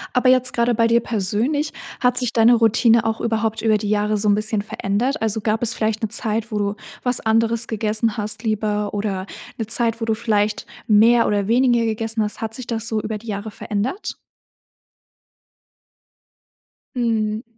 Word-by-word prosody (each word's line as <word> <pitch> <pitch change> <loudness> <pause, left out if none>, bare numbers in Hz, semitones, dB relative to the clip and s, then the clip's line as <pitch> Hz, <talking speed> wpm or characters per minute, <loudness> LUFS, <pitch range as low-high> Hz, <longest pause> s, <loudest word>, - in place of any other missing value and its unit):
Aber 255 0 +4
jetzt 255 0 +3
grade 235 0 +1
bei 230 +1 +3
dir 235 +1 +3
persönlich, 235 +9 -1 0.3
hat 250 -1 +2
sich 250 -2 +1
deine 230 +1 +5
Routine 230 0 +4
auch 225 0 -1
überhaupt 225 -1 -1
über 220 -1 +3
die 210 -1 -4
Jahre 210 0 +1
so 210 +1 +1
'n 205 - +5
bisschen 215 0 -1
verändert? 220 +7 -2
Also, 220 0 -1
gab 220 +2 0
es 235 - +2
vielleicht 220 +1 -1
ne, 220 - 0
Zeit, 220 0 -1
wo 210 - 0
du 205 0 -1 0.3
was 250 -1 +4
anderes 225 +1 +1
gegessen 220 0 -1
hast 210 0 -3
lieber 210 -1 -1
oder 200 -2 -3 0.3
'ne 225 - -4
Zeit, 230 0 +1
wo 225 - -2
du 225 - +1
vielleicht 215 -2 -1 0.2
mehr 230 +2 +5
oder 205 -1 0
weniger 240 -1 +3
gegessen 225 0 -1
hast? 210 - -4
Hat 225 0 -4
sich 255 +1 -5
das 230 -1 -2
so 220 -1 -1
über 215 +1 -4
die 225 +3 -15
Jahre 210 +1 -5
verändert? 215 - -4 2.8
Mhm. 220 -2 -1
225 Hz, 180 wpm, -21 LUFS, 210-235 Hz, 2.8 s, deine